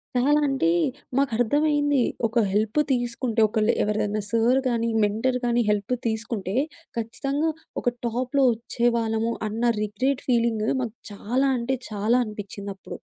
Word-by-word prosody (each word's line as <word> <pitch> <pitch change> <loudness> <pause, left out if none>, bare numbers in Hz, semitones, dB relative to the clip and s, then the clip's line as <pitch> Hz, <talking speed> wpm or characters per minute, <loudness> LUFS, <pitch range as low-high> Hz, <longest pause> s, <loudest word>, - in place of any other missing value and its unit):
చాలా 290 +4 +4
అంటే 270 -12 +1 0.5
మాకు 275 -3 +2
అర్థమైంది. 290 +2 +2 0.3
ఒక 230 +2 0
హెల్ప్ 215 +7 +1
తీసుకుంటే, 240 -2 -1
ఒకళ్ళు 215 +1 +1
ఎవర్దైనా 210 0 0
సార్ 235 +3 +3
గానీ, 230 -1 0
మెంటర్ 225 +5 +1
గానీ 240 0 +2
హెల్ప్ 210 +3 0
తీసుకుంటే 220 -3 -3 0.4
ఖచ్చితంగా 275 +7 -1 0.3
ఒక 245 - 0
టాప్‌లో 255 +4 0
ఒచ్చేవాళ్ళము 230 -1 0 0.2
అన్న 220 +3 -3 0.2
రిగ్రెట్ 250 +6 -1
ఫీలింగ్ 230 -3 +2 0.2
మాకు 235 -2 -4 0.2
చాలా 245 +7 0
అంటే 255 +3 -1 0.2
చాలా 215 +4 +2
అనిపించిందప్పుడు. 200 -2 -8
235 Hz, 125 wpm, -25 LUFS, 215-255 Hz, 0.5 s, చాలా